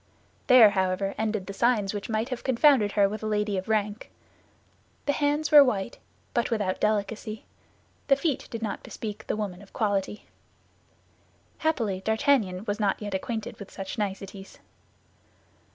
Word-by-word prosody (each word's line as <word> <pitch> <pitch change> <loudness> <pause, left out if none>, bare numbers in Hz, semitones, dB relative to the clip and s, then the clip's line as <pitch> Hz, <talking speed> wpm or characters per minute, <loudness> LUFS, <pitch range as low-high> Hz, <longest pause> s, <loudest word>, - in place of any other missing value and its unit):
There, 235 -5 +8
however, 190 0 0
ended 215 -3 -2
the 200 - -6
signs 215 -2 +1
which 205 +1 -5
might 220 +2 -1
have 250 -2 -5
confounded 260 -5 +4
her 200 -2 +4
with 215 +2 -5
a 215 - -3
lady 210 -1 0
of 190 +2 -4
rank. 210 0 -1 1.0
The 285 - +2
hands 290 +1 0
were 295 -2 +10
white, 220 -4 -2 0.3
but 235 - +1
without 205 -5 -1
delicacy; 215 +1 -1 0.6
the 275 - +6
feet 285 -1 -2
did 230 -1 -5
not 210 - -3
bespeak 210 -2 -7
the - - -1
woman 200 -3 -4
of 200 - -17
quality. 205 -1 -1 1.3
Happily, 225 -12 0
D'Artagnan 220 -4 +1
was 205 0 -2
not 205 -2 +1
yet 205 -2 -5
acquainted 220 +3 -4
with 200 - -9
such 195 +3 -6
niceties. 195 -1 -5
210 Hz, 150 wpm, -27 LUFS, 200-235 Hz, 1.3 s, were